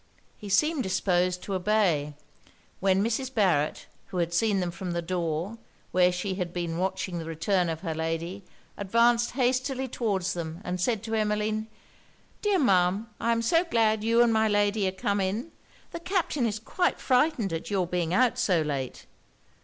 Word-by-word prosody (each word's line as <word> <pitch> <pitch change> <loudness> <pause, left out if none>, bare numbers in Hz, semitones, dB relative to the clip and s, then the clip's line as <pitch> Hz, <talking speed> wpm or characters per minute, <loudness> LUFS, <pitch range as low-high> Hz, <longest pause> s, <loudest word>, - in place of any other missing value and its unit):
He 205 - -9
seemed 300 +10 +2
disposed 180 -3 0
to 200 - -4
obey; 180 -7 +1 0.6
when 190 0 +2
Mrs. 245 +4 -1
Barret, 180 - +1 0.2
who 185 - -6
had 170 -1 0
seen 200 +2 +2
them 180 -2 -1
from 175 +1 -5
the 170 - -1
door, 175 +4 -2 0.3
where 180 0 +4
she 180 +2 -3
had 180 -2 -3
been 170 -1 -3
watching 185 -1 -2
the 165 - -6
return 170 +3 0
of 160 -1 -4
her 165 -4 -3
lady, 165 +4 -3 0.3
advanced 235 +4 +2
hastily 260 +1 0
towards 200 -7 -1
them, 165 -1 -5
and 180 -2 -3
said 220 +1 0
to 225 -1 -5
Emmeline 215 0 0 0.7
'Dear 410 -2 +2
Ma'am, 195 - +2
I 235 - +1
am 230 0 +1
so 330 +9 +3
glad 220 -9 +1
you 230 +1 +4
and 235 -1 +3
my 220 0 +3
lady 205 -1 +2
are - - 0
come 200 +2 -1
in! 210 - -2 0.4
The 335 - -5
Captain 340 -8 0
is 215 -1 -2
quite 290 +11 -1
frightened 250 - +2
at 165 - -4
your 195 -3 +1
being 175 -1 -2
out 245 +5 +3
so 175 -5 +2
late.' 140 -4 -4
195 Hz, 175 wpm, -27 LUFS, 175-230 Hz, 0.7 s, where